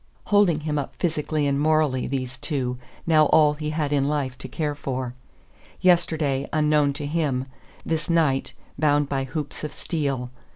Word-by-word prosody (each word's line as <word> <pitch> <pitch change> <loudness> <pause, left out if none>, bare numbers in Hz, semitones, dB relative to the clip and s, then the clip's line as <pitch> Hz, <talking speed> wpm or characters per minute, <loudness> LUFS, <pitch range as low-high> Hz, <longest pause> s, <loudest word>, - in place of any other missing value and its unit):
Holding 200 -7 +3
him 150 -1 -1
up 140 - -5
physically 155 -2 -1
and 140 0 +1
morally, 150 -4 +2
these 130 -2 -3
two, 130 -4 -2 0.3
now 155 -2 +5
all 150 0 +5
he 150 0 -4
had 150 -2 -1
in 140 -1 +2
life 140 -4 -1
to 130 - -6
care 150 +3 -2
for. 130 -3 -4 0.7
Yesterday, 160 -6 +2
unknown 150 -2 +3
to 145 +1 -4
him; 145 -4 0 0.4
this 160 +1 -2
night, 155 -6 +2 0.3
bound 145 -2 +3
by 135 -1 -1
hoops 145 +2 -5
of 150 - -3
steel. 135 -6 -3
150 Hz, 160 wpm, -24 LUFS, 135-155 Hz, 0.7 s, now